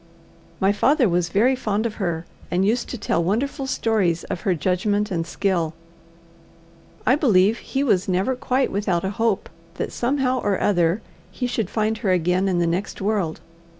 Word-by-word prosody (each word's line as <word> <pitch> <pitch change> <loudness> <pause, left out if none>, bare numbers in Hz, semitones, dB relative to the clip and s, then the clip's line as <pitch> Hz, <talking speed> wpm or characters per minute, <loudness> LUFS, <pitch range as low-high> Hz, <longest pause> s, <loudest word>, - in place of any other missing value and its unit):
My 195 +1 +3
father 265 +5 +3
was 175 -1 +1
very 240 +8 +3
fond 215 -3 -1
of 230 - -1
her, 170 -3 -2 0.2
and 185 +2 +1
used 230 +4 0
to 250 - -4
tell 170 -5 0
wonderful 265 +9 -1
stories 200 -10 +1
of 185 -3 -5
her 185 - +1
judgment 205 +5 0
and 165 -2 -1
skill. 170 -4 -1 1.3
I 260 - +5
believe 220 - +3
he 270 +1 -2
was 195 -9 +2
never 190 +7 +1
quite 255 +1 0
without 190 -3 0
a 190 - -1
hope 225 -1 0 0.3
that - - -3
somehow 255 0 0
or 200 -2 0
other 175 +1 +2 0.3
he 250 - -4
should 225 -5 -1
find 215 0 0
her 205 - -1
again 180 +1 +2
in 185 -2 +1
the 175 - +2
next 175 +4 -2
world. 195 -5 -1
200 Hz, 175 wpm, -23 LUFS, 180-230 Hz, 1.3 s, I